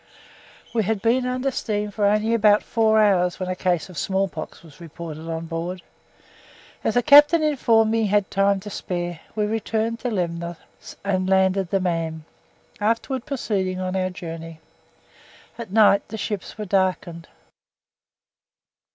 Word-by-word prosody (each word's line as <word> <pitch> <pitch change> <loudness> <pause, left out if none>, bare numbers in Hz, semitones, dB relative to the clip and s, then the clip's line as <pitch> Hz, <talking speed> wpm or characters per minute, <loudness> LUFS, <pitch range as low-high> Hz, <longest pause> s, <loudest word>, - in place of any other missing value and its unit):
We 230 - +2
had 215 +1 -1
been 245 +5 +1
under 255 +2 -1
steam 210 -4 -2
for 205 0 +1
only 215 +2 +2
about 210 -2 +4
four 220 -2 +2
hours 185 -4 +2
when 185 -1 -3
a 185 - -1
case 180 -2 0
of 180 -6 -7
smallpox 190 -5 -3
was 160 0 -16
reported 165 -1 -8
on 165 0 -4
board. 170 +2 -5 1.0
As 220 - 0
the 245 - +3
captain 295 +4 +7
informed 230 -7 +3
me 225 0 +1
he 215 - +1
had 205 0 +1
time 195 0 +2
to 205 +1 -8
spare, 175 -3 -4 0.2
we 210 -1 +1
returned 225 +1 -2
to 245 - -2
Lemnor 170 -4 -3 0.5
and 185 -2 0
landed 190 -1 +2
the 195 - +1
man, 165 -3 -2 0.5
afterwards 230 +4 -1
proceeding 195 -9 -2
on 185 0 -3
our 185 -1 0
journey. 165 -2 -8 1.0
At 230 -4 -6
night 205 -1 +4
the 220 - -6
ship 210 -2 -3 0.2
was 210 -1 -5
darkened. 180 -3 -1
195 Hz, 150 wpm, -23 LUFS, 175-220 Hz, 1.0 s, captain